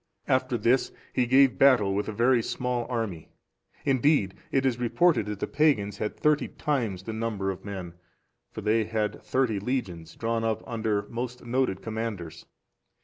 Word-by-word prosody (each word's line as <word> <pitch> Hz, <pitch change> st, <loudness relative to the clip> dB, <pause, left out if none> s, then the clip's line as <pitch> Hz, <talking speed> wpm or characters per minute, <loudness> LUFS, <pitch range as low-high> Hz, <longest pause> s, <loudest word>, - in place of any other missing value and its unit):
After 130 Hz, -1 st, +1 dB
this 120 Hz, +4 st, +2 dB, 0.2 s
he 125 Hz, -1 st, +1 dB
gave 135 Hz, 0 st, +5 dB
battle 125 Hz, -8 st, +5 dB
with 100 Hz, +1 st, -1 dB
a -, -, -2 dB
very 120 Hz, +3 st, +3 dB
small 125 Hz, 0 st, -2 dB
army: 110 Hz, -10 st, -3 dB, 0.6 s
indeed, 135 Hz, -7 st, +3 dB, 0.2 s
it 135 Hz, 0 st, +2 dB
is 125 Hz, -2 st, +1 dB
reported 125 Hz, -, +2 dB
that 105 Hz, -2 st, -4 dB
the -, -, -1 dB
pagans 110 Hz, -10 st, +1 dB
had 105 Hz, -, -3 dB
thirty 150 Hz, -1 st, +2 dB
times 115 Hz, -11 st, -2 dB
the 110 Hz, -, -5 dB
number 110 Hz, -3 st, -2 dB
of 95 Hz, -, -9 dB
men; 95 Hz, -4 st, -6 dB, 0.6 s
for -, -, -7 dB
they 110 Hz, +1 st, +2 dB
had 110 Hz, -1 st, -2 dB
thirty 125 Hz, -6 st, 0 dB
legions, 95 Hz, -8 st, -3 dB
drawn 115 Hz, 0 st, -1 dB
up 110 Hz, -1 st, -1 dB
under 110 Hz, -3 st, -1 dB
most 125 Hz, +1 st, -5 dB
noted 120 Hz, -6 st, 0 dB
commanders. 105 Hz, -8 st, -5 dB
115 Hz, 160 wpm, -27 LUFS, 100-130 Hz, 0.6 s, gave